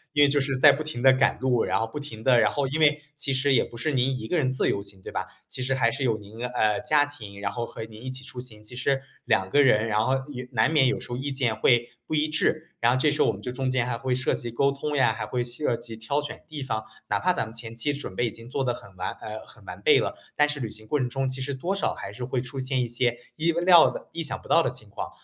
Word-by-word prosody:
因 145 - +6
为 145 - +6
就 145 +1 +3
是 135 -1 -1
在 145 +2 +8
不 140 +2 -2
停 155 -5 -5
地 135 - +8
赶 130 - +3
路， 125 -3 +2
然 - - +1
后 110 - 0
不 115 - -6
停 115 -7 -8
地 125 -1 +5
然 110 -2 +4
后 135 +5 -1
因 150 +4 -2
为 150 -1 +4 0.2
其 145 -2 -2
实 135 +1 +2
也 125 - +4
不 - - -13
是 140 +7 -1
您 130 -1 +1
一 110 -2 -7
个 180 - +1
人 130 -5 +2
自 130 - +2
由 100 - 0
行， 100 -1 -12
对 - - -8
吧？ - - -3 0.2
其 - - -6
实 130 +1 0
还 115 -3 +3
是 140 -1 -2
有 115 -3 +2
您 105 +2 -11
呃， 110 -4 +1
家 150 -1 +3
庭， 105 -9 -10
然 100 -1 -1
后 120 - -3
和 115 - -7
您 110 0 -11
一 130 - -5
起 130 0 -6
出 125 - -9
行， 110 -4 -11
其 120 +3 -10
实 135 +2 +1 0.2
2 95 0 +2
个 145 - +5
人， 115 -5 +4
然 105 -1 +1
后 130 - +2 0.2
也 125 -2 -6
难 110 +5 +3
免 145 -5 +5
有 135 - 0
时 - - -8
候 120 - -3
意 140 +2 -3
见 125 -4 +1
会 120 +1 +3 0.2
不 155 - -1
一 155 0 +2
致， 155 +2 0
然 120 +1 +4
后 - - +2
这 145 +3 +3
时 150 - 0
候 - - +5
我 - - +2
们 - - -9
就 125 - -4
中 130 +1 -2
间 130 -2 +1
还 125 -1 -2
会 125 +2 -1
涉 130 0 +1
及 120 - -4
沟 140 +4 +2
通 145 +2 -3
呀， 130 -5 +4
还 110 - -4
会 125 -1 -1
涉 120 +1 -1
及 115 -1 -9
挑 140 +6 -1
选 150 +2 -7
地 155 -3 -6
方。 110 -4 -3 0.2
哪 - - +1
怕 180 0 +2
咱 - - 0
们 110 0 -8
前 115 0 -7
期 120 +6 0
准 140 -9 -6
备 120 - +1
已 - - -4
经 115 +2 -12
做 135 +2 -1
得 125 -2 +1
很 100 -5 -12
完 90 - -3
呃， 110 0 -6
很 - - -15
完 - - -8
备 - - +6
了， - - -2 0.2
但 150 - +5
是 150 -1 -4
旅 115 -3 -3
行 110 0 -9
过 150 - +1
程 125 -3 0
中 135 +2 -1
其 130 0 -4
实 140 +2 -2
多 170 +9 -2
少 195 - 0
还 100 - -7
是 125 +4 -6
会 130 +1 -1
出 125 +2 -6
现 130 0 0
一 120 - -1
些 120 0 0 0.2
意 165 +2 +2
料 175 0 +6
的 - - -8
意 165 - -2
想 150 - -4
不 - - -14
到 - - +5
的 - - 0
情 - - -12
况。 - - -5
130 Hz, 335 characters per minute, -26 LUFS, 115-145 Hz, 0.2 s, 在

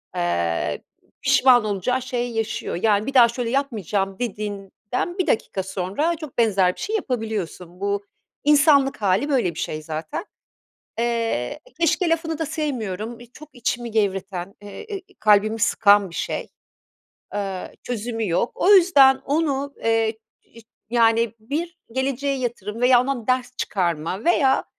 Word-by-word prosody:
eee, 85 -1 -1 0.4
pişman 250 -3 +5
olacağı 215 +5 -1
şeyi 245 -2 -3
yaşıyor. 225 0 -2
Yani 210 -1 +3
bir 275 - -4
daha 245 -3 +8
şöyle 235 0 -3
yapmayacağım 210 - -1
dediğinden 210 - -4
1 365 - +1
dakika 210 -7 0
sonra 195 - -1
çok 310 -4 -10
benzer 195 -6 +3
bir - - -15
şey 435 - -2
yapabiliyorsun. 220 - -4
Bu 200 0 -1 0.4
insanlık 285 -3 +4
hâli 200 +8 +2
böyle 240 - +1
bir - - -6
şey 155 - -3
zaten. 155 - -5 0.7
Eee, 230 - -1 0.2
keşke 335 +2 +2
lafını 325 -1 -1
da 320 - -2
sevmiyorum. 240 - -4
Eee, 240 - -12
çok 305 +2 -13
içimi 240 -1 -3
gevreten, 195 -3 -2
e 205 - -12
e 410 - -7 0.2
kalbimi 215 +1 +4
sıkan 205 -3 +4
bir - - -13
şey. - - -3 0.9
Eee, 195 -3 -4
çözümü 225 -2 -3
yok. 175 +8 +1
O 385 - +2
yüzden 295 -9 +7
onu, 285 -2 0
eee, 225 -1 +1 0.2
iş 230 - -17 0.3
yani 230 -1 +3
bir 325 +9 -4
geleceğe 270 +2 -1
yatırım 230 -3 -4
veya 250 0 +6
ondan 250 -3 -2
ders 255 0 0
çıkarma 175 0 -2
veya 280 -6 +3
230 Hz, 140 wpm, -23 LUFS, 200-275 Hz, 0.9 s, daha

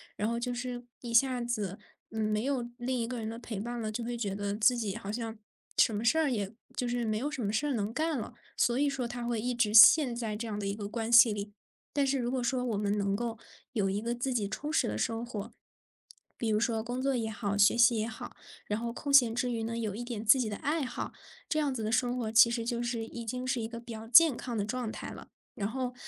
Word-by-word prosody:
然 210 - -1
后 235 +1 -1
就 245 +1 -2
是 245 0 -5 0.2
一 235 -2 -6
下 250 +1 +4
子， 210 -5 -3 0.3
嗯， 220 0 -4
没 215 +1 0
有 260 -3 -1
另 250 0 -2
一 230 - -1
个 245 0 -4
人 220 -1 -4
的 230 - -6
陪 230 -4 -6
伴 240 +3 -4
了， 215 -1 -3
就 235 +2 -4
会 240 +1 -3
觉 205 -4 -2
得 205 0 -2
自 225 +4 +4
己 215 -5 -2
好 205 -3 -5
像 225 -1 -4 0.4
什 220 - +4
么 210 - -2
事 235 +7 +3
儿 305 -4 +2
也 200 -4 -2 0.2
就 250 - -1
是 240 -1 -1
没 215 -1 0
有 280 +6 -2
什 255 -5 -4
么 200 - 0
事 290 +6 0
能 215 0 -2
干 315 -2 0
了。 235 - -6 0.2
所 240 0 +2
以 285 +1 +2
说 265 -3 -3
他 240 0 -6
会 235 -1 -1
一 245 +3 -1
直 235 -3 +1
陷 245 +3 +8
在 225 -3 -3
这 230 +2 -5
样 210 - -4
的 205 - -4
一 200 - -1
个 205 -1 -5
关 225 +1 -3
系 235 -1 +8
里。 205 0 -6 0.4
但 285 -1 +2
是 270 0 +1
如 245 0 -1
果 260 -1 -1
说 250 +1 0
我 235 -4 -1
们 205 0 0
能 200 0 0
够 230 -1 -3 0.4
有 200 -4 +1
一 200 +2 -1
个 235 +2 -2
自 255 +2 -2
己 210 -5 0
充 295 +8 -4
实 - - +2
的 105 0 -3
生 225 - -1
活， 225 -1 -6 0.9
比 230 - -2
如 215 - +2
说 225 0 0
工 245 +3 -4
作 275 +1 +1
也 220 -1 -2
好， 205 -2 -3
学 205 +3 +5
习 235 -1 +5
也 215 - -1
好， 225 - -9 0.3
然 210 +1 -2
后 235 0 -4
空 285 +2 -4
闲 240 -5 +6
之 245 0 0
余 230 -1 -2
呢， 230 +1 -3
有 220 -4 -2
一 220 - -6
点 230 -3 -5
自 245 +5 +7
己 240 - 0
的 210 - -3
爱 295 +6 -1
好， - - -5 0.4
这 310 - +1
样 285 -3 0
子 225 - -3
的 215 - -1
生 245 +1 +1
活 225 -3 -2
其 230 +1 +7
实 235 -1 -2
就 240 0 -2
是 240 -2 -2
已 235 +1 -8
经 250 +3 -4
是 255 -1 0
一 220 - -3
个 230 +1 -8
比 235 0 -10
较 225 0 -7
健 280 +2 +7
康 240 -3 -4
的 205 - 0
状 245 +2 -3
态 - - -7
了。 - - -10 0.3
然 200 +1 -3
后， 255 0 -3
235 Hz, 295 characters per minute, -30 LUFS, 215-245 Hz, 0.9 s, 陷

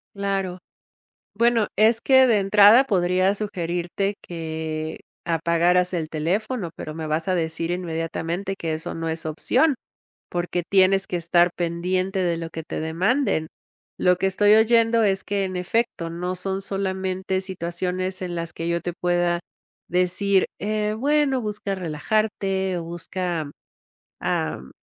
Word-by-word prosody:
Claro. 195 -2 -2 0.8
Bueno, 235 0 +3
es 220 +2 +4
que 260 +1 +6
de 230 -4 +4
entrada 205 +5 +7
podría 185 -1 +2
sugerirte 180 0 -2
que 160 -2 -5 0.3
apagaras 170 +2 +2
el 165 -3 -2
teléfono, 180 +5 -2
pero 155 - -7
me 160 -1 -5
vas 160 +3 -1
a 185 - +2
decir 165 0 -2
inmediatamente 170 +2 -3
que 160 -1 -3
eso 160 +3 -4
no 165 0 -3
es 160 0 -4
opción, 270 - +2 0.6
porque 175 0 -2
tienes 195 0 +4
que - - -3
estar 175 +1 +3
pendiente 185 +3 -1
de 170 -2 +1
lo 165 0 -5
que 160 - -6
te 155 - -5
demanden. 180 - +1 0.5
Lo 180 0 +3
que 195 - +1
estoy 205 +2 +4
oyendo 230 +1 +4
es 195 -2 +1
que 200 -1 -1
en 185 - -5
efecto, 180 -2 -1
no 180 +2 -3
son 190 +1 -2
solamente 190 -1 -2
situaciones 185 0 -3
en 175 -1 -4
las 170 -1 -3
que 165 - -5
yo 170 0 0
te 175 - -3
pueda 175 0 +1 0.5
decir, 185 +2 +2
eh, 210 0 -1
"bueno, 275 +3 +2
busca 210 -2 -3
relajarte 190 +2 -1
o 170 - -5
busca, 170 -2 -3 0.7
am, 65 - -2
185 Hz, 140 wpm, -23 LUFS, 170-200 Hz, 0.8 s, entrada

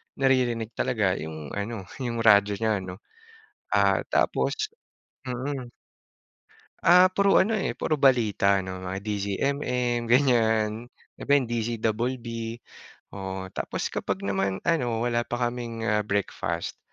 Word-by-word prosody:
naririnig 125 -4 +1
talaga 100 -7 0
yung 80 -2 -7
ano 100 0 -4 0.2
yung 115 -3 -2
radyo 100 -2 +5
niya 110 -1 0
'no, 90 -1 -7 0.8
ah, - - +3
tapos 430 0 +1 0.6
mm. 130 0 -4 1.1
Ah, 180 +2 +7
puro 200 +1 +3
ano, 220 +3 +2
eh, 195 - -1
puro 155 - +1
balita 110 -8 +3
'no, 95 0 -6
mga 95 +1 -4
DZMM 120 +4 -1
ganyan, 115 -3 +2 0.3
iba - - -4
yung 125 - -4
DZ 115 -1 -2
Double 120 +4 -1
B. 115 0 -5 0.5
Oh 95 -1 -6
tapos - - -3
kapag - - -3
naman 95 -1 -1
ano 120 -9 0
wala 120 0 0
pa 120 +1 -3
kaming, 120 -2 -6
ah, 105 -2 +1
breakfast, 95 -4 -2
115 Hz, 130 wpm, -26 LUFS, 100-125 Hz, 1.1 s, Ah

